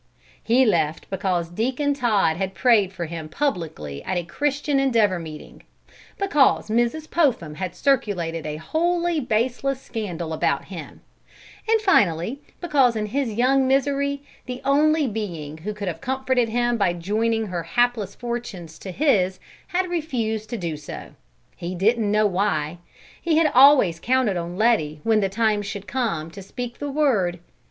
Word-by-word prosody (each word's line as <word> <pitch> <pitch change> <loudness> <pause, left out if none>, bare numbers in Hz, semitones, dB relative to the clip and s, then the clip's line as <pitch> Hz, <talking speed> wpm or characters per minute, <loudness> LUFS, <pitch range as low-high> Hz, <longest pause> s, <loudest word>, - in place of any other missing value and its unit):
He 250 +3 +4
left 160 -7 +1
because 185 -3 -1
Deacon 255 - 0
Todd 215 - +2
had 190 +2 -3
prayed 205 -1 +4
for 175 -3 -5
him 160 -1 -6
publicly 155 - -3
at 185 - -2
a 175 - -1
Christian 280 - -1
Endeavor 225 -9 +2
meeting; 155 -2 -10 0.6
because 300 - +3
Mrs. 240 +8 0
Popham 250 - +1
had 185 +3 -5
circulated 180 - 0
a 150 - -3
wholly 340 - 0
baseless 250 +2 0
scandal 180 -10 -5
about 155 - 0
him; - - -9 0.7
and 450 0 +5
finally 220 - +2 0.2
because 280 -8 +3
in 215 -1 -1
his 255 +3 -1
young 260 +4 +3
misery 280 +1 +1 0.2
the 250 0 -5
only 300 +2 +3
being 170 - -5
who 200 +7 -4
could 205 -1 -6
have 165 -2 -4
comforted 260 -2 0
him 240 +1 +1
by 195 -5 +2
joining 220 +6 0
her 180 -4 -3
hapless 215 +3 0
fortunes 225 -10 -6
to 195 - -8
his 190 - +1 0.3
had 365 +1 0
refused 235 -11 -2
to 235 - -3
do 170 -5 -3
so. 150 - -9 0.4
He 175 +2 -5
didn't 215 +3 +2
know 215 0 +3
why. 180 -5 0 0.4
He 330 -2 +1
had 320 -2 +4
always 255 - +6
counted 250 -1 +1
on 175 +1 -4
Letty 195 -10 +2
when 220 -1 +3
the 195 -2 +1
time 215 +1 +1
should 200 0 -6
come 185 -10 -2
to 195 - -9
speak 240 +5 -7
the 290 - -3
word. 245 -12 +1
220 Hz, 155 wpm, -23 LUFS, 175-265 Hz, 0.7 s, always